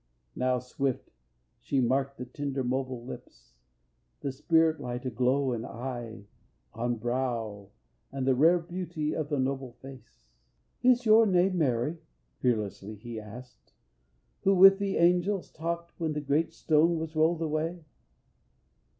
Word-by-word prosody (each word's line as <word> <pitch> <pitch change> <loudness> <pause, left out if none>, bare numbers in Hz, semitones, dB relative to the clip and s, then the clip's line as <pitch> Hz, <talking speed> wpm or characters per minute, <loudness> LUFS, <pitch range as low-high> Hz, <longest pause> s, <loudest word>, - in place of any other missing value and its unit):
Now 125 0 +1
swift 125 +1 -3 0.5
she 135 - -1
marked 135 +2 +1
the 125 - -6
tender 135 +1 -3
mobile 130 -1 -2
lips, - - -11 0.7
The 140 - -2
spirit 160 +3 +2
light 125 -1 -5
aglow 130 +2 +1
in 115 -1 -3
eye, 120 -4 -6 0.5
on 120 +2 -1
brow, 115 -4 -3 0.4
And 135 -1 -3
the 135 - +4
rare 160 +7 +5
beauty 170 -3 -4
of 155 -2 -3
the 145 - 0
noble 135 -1 -2
face. 135 +1 -14 0.6
"Is 250 -1 +4
your 220 +1 +6
name 185 0 +3
Mary," 140 +3 0 0.4
fearlessly 110 -3 -1
he 115 +2 -7
asked, 110 +2 -12 0.7
"Who 195 0 +3
with 195 +1 +8
the 200 -1 -1
angels 180 +3 +2
talked 170 +1 -4
when 160 -2 -1
the 150 - -2
great 145 +3 +1
stone 165 +2 +2
Was 160 0 -5
rolled 160 +1 +2
away? 160 +2 -2
135 Hz, 135 wpm, -29 LUFS, 125-165 Hz, 0.7 s, with